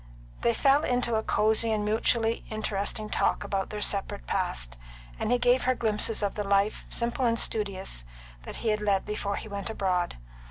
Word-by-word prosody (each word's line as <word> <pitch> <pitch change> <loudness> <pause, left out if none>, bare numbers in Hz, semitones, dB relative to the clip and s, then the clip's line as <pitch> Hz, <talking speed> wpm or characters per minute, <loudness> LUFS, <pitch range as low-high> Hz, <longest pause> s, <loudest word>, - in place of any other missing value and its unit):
They 235 - +2
fell 280 +4 +4
into 245 -3 0
a 220 - +2
cosy 220 +1 +2
and 210 -1 0
mutually 225 +1 +1
interesting 215 0 -2
talk - - +1
about 195 -1 -2
their 210 -1 -2
separate 195 - 0
past, - - -1 0.4
and - - -1
he 245 - +5
gave 245 +1 +3
her 255 0 +3
glimpses 220 -1 0
of 200 - 0
the 210 - -2
life, 200 +1 +1
simple 235 +2 -1
and 230 -1 +2
studious, 195 - -1 0.5
he 225 - -2
had 210 0 +1
led 200 -2 +1
before 205 -1 -2
he - - -6
went 200 0 -5
abroad. 185 - -1
215 Hz, 175 wpm, -28 LUFS, 200-230 Hz, 0.5 s, he